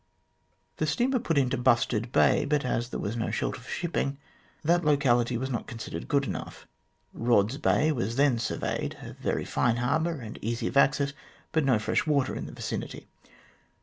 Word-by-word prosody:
The -, -, 0 dB
steamer 255 Hz, +1 st, +1 dB
put 165 Hz, -10 st, -1 dB
into 130 Hz, -3 st, +2 dB
Bustard 120 Hz, -2 st, +2 dB
Bay, -, -, +4 dB
but 145 Hz, -2 st, 0 dB
as 120 Hz, -1 st, -1 dB
there -, -, -4 dB
was 105 Hz, +3 st, -3 dB
no 115 Hz, -, -1 dB
shelter 130 Hz, -, -2 dB
for 125 Hz, -, -13 dB
shipping, 160 Hz, -5 st, -2 dB, 0.5 s
that 175 Hz, +3 st, +3 dB
locality 125 Hz, -5 st, +3 dB
was 130 Hz, +3 st, -3 dB
not 120 Hz, -, -3 dB
considered 110 Hz, -8 st, -6 dB
good 140 Hz, -1 st, +2 dB
enough. -, -, -6 dB, 0.5 s
Eodd's 115 Hz, +2 st, +2 dB
Bay 155 Hz, 0 st, +3 dB
was 115 Hz, -5 st, -2 dB
then 135 Hz, -3 st, +3 dB
surveyed 110 Hz, -, -2 dB
a -, -, -8 dB
very -, -, -2 dB
fine 120 Hz, -2 st, +1 dB
harbour, 160 Hz, +7 st, 0 dB
and 110 Hz, -3 st, -8 dB
easy 115 Hz, +2 st, -2 dB
of -, -, -2 dB
access, 140 Hz, 0 st, +3 dB, 0.4 s
but 160 Hz, -1 st, +2 dB
no 130 Hz, -4 st, +4 dB
fresh 105 Hz, +8 st, 0 dB
water 140 Hz, -4 st, +2 dB
in -, -, -5 dB
the -, -, -8 dB
vicinity. -, -, -5 dB
130 Hz, 180 wpm, -28 LUFS, 120-145 Hz, 0.5 s, Bay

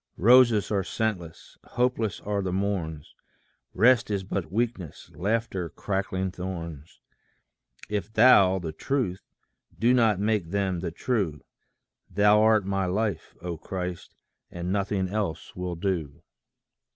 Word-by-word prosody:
Roses 120 Hz, 0 st, +5 dB
are 100 Hz, -2 st, +1 dB
scentless, 90 Hz, -6 st, -4 dB
hopeless 120 Hz, -5 st, -1 dB
are 100 Hz, -1 st, -2 dB
the 95 Hz, -1 st, -2 dB
morns, 90 Hz, -6 st, -3 dB, 0.6 s
Rest 120 Hz, 0 st, +4 dB
is 100 Hz, -2 st, -1 dB
but 95 Hz, -4 st, -4 dB
weakness, 110 Hz, -6 st, -3 dB
laughter 95 Hz, -2 st, -2 dB
crackling 95 Hz, -1 st, -2 dB
thorns, 85 Hz, -5 st, -7 dB, 0.9 s
If 105 Hz, +1 st, -3 dB
thou, 105 Hz, -5 st, +6 dB
the 85 Hz, -4 st, -4 dB
Truth, 100 Hz, -, -2 dB, 0.6 s
do 120 Hz, +3 st, +3 dB
not 110 Hz, -6 st, +3 dB
make 105 Hz, -5 st, 0 dB
them 95 Hz, -2 st, -1 dB
the 85 Hz, -, -3 dB
true: 85 Hz, -, -2 dB, 0.7 s
Thou 105 Hz, +2 st, +4 dB
art 110 Hz, -2 st, +4 dB
my 95 Hz, -1 st, -1 dB
life, 105 Hz, +3 st, -2 dB
O 85 Hz, -2 st, -4 dB
Christ, 90 Hz, +1 st, -6 dB, 0.3 s
and 85 Hz, +1 st, -4 dB
nothing 100 Hz, -1 st, 0 dB
else 100 Hz, -5 st, -4 dB
will 90 Hz, -1 st, -4 dB
do. 85 Hz, -5 st, -3 dB
95 Hz, 125 wpm, -26 LUFS, 90-110 Hz, 0.9 s, thou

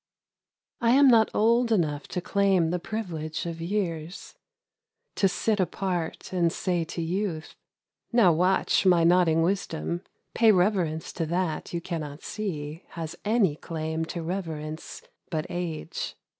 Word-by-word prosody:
I 235 Hz, 0 st, +4 dB
AM 275 Hz, 0 st, +7 dB
not 225 Hz, -3 st, +5 dB
old 230 Hz, +2 st, +3 dB
enough 150 Hz, -8 st, +1 dB
to 180 Hz, -, -3 dB
claim 195 Hz, -4 st, +2 dB
the 180 Hz, -, 0 dB
privilege 170 Hz, -7 st, -4 dB
of 165 Hz, -1 st, -5 dB
years, 170 Hz, -2 st, -3 dB, 0.8 s
To 195 Hz, -, +4 dB
sit 210 Hz, +3 st, 0 dB
apart 180 Hz, -1 st, -2 dB
and 170 Hz, -2 st, +2 dB
say 175 Hz, -1 st, -1 dB
t<> 165 Hz, +1 st, -4 dB
vouth 175 Hz, -3 st, -2 dB, 0.3 s
— -, -, -54 dB
Now 230 Hz, -7 st, +6 dB
watch 180 Hz, +4 st, +2 dB
my 180 Hz, -3 st, +5 dB
nodding 165 Hz, -2 st, +4 dB
wisdom; 175 Hz, -2 st, -1 dB, 0.3 s
I 235 Hz, -, +2 dB
'.iy 215 Hz, -4 st, +7 dB
reverence 180 Hz, -4 st, 0 dB
to 165 Hz, -2 st, -2 dB
that 170 Hz, -1 st, -2 dB
you 170 Hz, -, -3 dB
cannot 160 Hz, -4 st, -5 dB
see 160 Hz, -7 st, -4 dB, 0.2 s
Has 165 Hz, -1 st, -4 dB
any 210 Hz, -7 st, +2 dB
claim 160 Hz, 0 st, -3 dB
to 170 Hz, 0 st, -5 dB
reverence 160 Hz, -3 st, -5 dB, 0.3 s
but 155 Hz, -2 st, -2 dB
age.' 175 Hz, -3 st, -4 dB
175 Hz, 145 wpm, -27 LUFS, 160-195 Hz, 0.8 s, AM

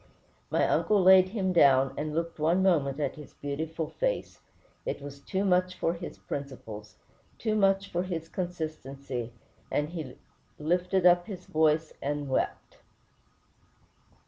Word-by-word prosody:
My -, -, +2 dB
uncle 210 Hz, -1 st, +3 dB
laid 185 Hz, 0 st, +7 dB
him 190 Hz, -3 st, -1 dB
down, 135 Hz, -5 st, +5 dB
and 150 Hz, 0 st, -3 dB
looked 165 Hz, 0 st, -2 dB
one 170 Hz, +5 st, +3 dB
moment 150 Hz, -7 st, +2 dB
at 145 Hz, -1 st, -2 dB
his 150 Hz, -3 st, -12 dB
beautiful 160 Hz, +3 st, -3 dB
face. -, -, -1 dB, 0.4 s
It -, -, -3 dB
was 140 Hz, 0 st, -9 dB
too 190 Hz, +6 st, -2 dB
much 180 Hz, -1 st, +2 dB
for 165 Hz, -, 0 dB
his 170 Hz, 0 st, -7 dB
principles, 110 Hz, -7 st, -7 dB, 0.4 s
too 220 Hz, -2 st, -1 dB
much 195 Hz, -1 st, +2 dB
for 175 Hz, -, 0 dB
his 170 Hz, -3 st, -4 dB
consistency, 140 Hz, -9 st, -5 dB, 0.4 s
and 150 Hz, +1 st, 0 dB
"he 160 Hz, -7 st, -6 dB, 0.4 s
lifted 180 Hz, +4 st, +1 dB
up 175 Hz, 0 st, +5 dB
his 185 Hz, -4 st, -7 dB
voice 155 Hz, 0 st, +2 dB
and 145 Hz, 0 st, -2 dB
wept." 130 Hz, -, -2 dB
165 Hz, 140 wpm, -29 LUFS, 145-185 Hz, 0.4 s, laid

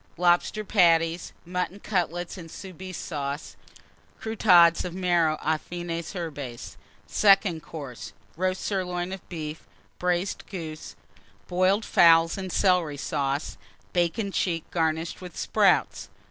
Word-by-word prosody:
Lobster 175 Hz, +4 st, +2 dB
Patties. 170 Hz, -4 st, +3 dB
Mutton 180 Hz, +2 st, -3 dB
Cutlets 175 Hz, -3 st, -2 dB
and 170 Hz, -4 st, -9 dB
Soubise 185 Hz, 0 st, -8 dB
Sauce. 145 Hz, -2 st, -5 dB, 0.6 s
Croûtades 180 Hz, -7 st, +5 dB
of 180 Hz, -1 st, -5 dB
Marrow 175 Hz, -4 st, +2 dB
aux 155 Hz, 0 st, +2 dB
fines 175 Hz, +1 st, -5 dB
herbes. 145 Hz, -9 st, -6 dB, 0.3 s
SECOND 195 Hz, -5 st, +4 dB
COURSE. 145 Hz, -6 st, -8 dB, 0.2 s
Roast 185 Hz, +2 st, -1 dB
Sirloin 180 Hz, -2 st, -2 dB
of 190 Hz, -, -10 dB
Beef. 155 Hz, -2 st, -6 dB, 0.3 s
Braised 180 Hz, +2 st, -1 dB
Goose. 155 Hz, -, -7 dB, 0.5 s
Boiled 185 Hz, +4 st, +2 dB
Fowls 165 Hz, -1 st, +5 dB
and 190 Hz, -2 st, -5 dB
Celery 175 Hz, -6 st, +2 dB
Sauce. 140 Hz, +1 st, -2 dB, 0.4 s
Bacon 180 Hz, +4 st, 0 dB
cheek, 170 Hz, -4 st, -1 dB
garnished 160 Hz, +1 st, -1 dB
with 180 Hz, -2 st, -9 dB
Sprouts. -, -, +2 dB
175 Hz, 115 wpm, -26 LUFS, 160-185 Hz, 0.6 s, Croûtades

